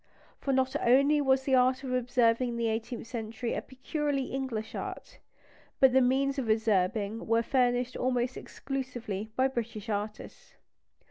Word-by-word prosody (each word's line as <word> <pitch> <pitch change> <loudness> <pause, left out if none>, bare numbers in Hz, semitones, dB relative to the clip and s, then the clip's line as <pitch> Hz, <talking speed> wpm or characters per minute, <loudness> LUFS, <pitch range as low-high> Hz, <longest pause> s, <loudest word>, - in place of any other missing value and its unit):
For 275 - -1
not 260 0 +1
only 280 +5 +4
was 265 -1 +3
the 265 - -1
art 255 +1 +3
of 255 -1 -3
observing 245 -1 +2
in 235 - -4
the 230 -1 0
eighteenth 225 +2 -4
century 230 0 -4
a - - -2
peculiarly 275 0 -3
English 230 -5 -3
art, - - -7 0.6
but 265 -2 +6
the 265 - +5
means 270 +2 +2
of 240 -4 -3
observing 215 0 +1
were 230 +1 +3
furnished 245 0 +1
almost 250 0 0
exclusively 245 -7 -5
by 260 +1 +3
British 230 -4 -5
artists. 210 +1 -5
250 Hz, 150 wpm, -29 LUFS, 225-265 Hz, 0.6 s, but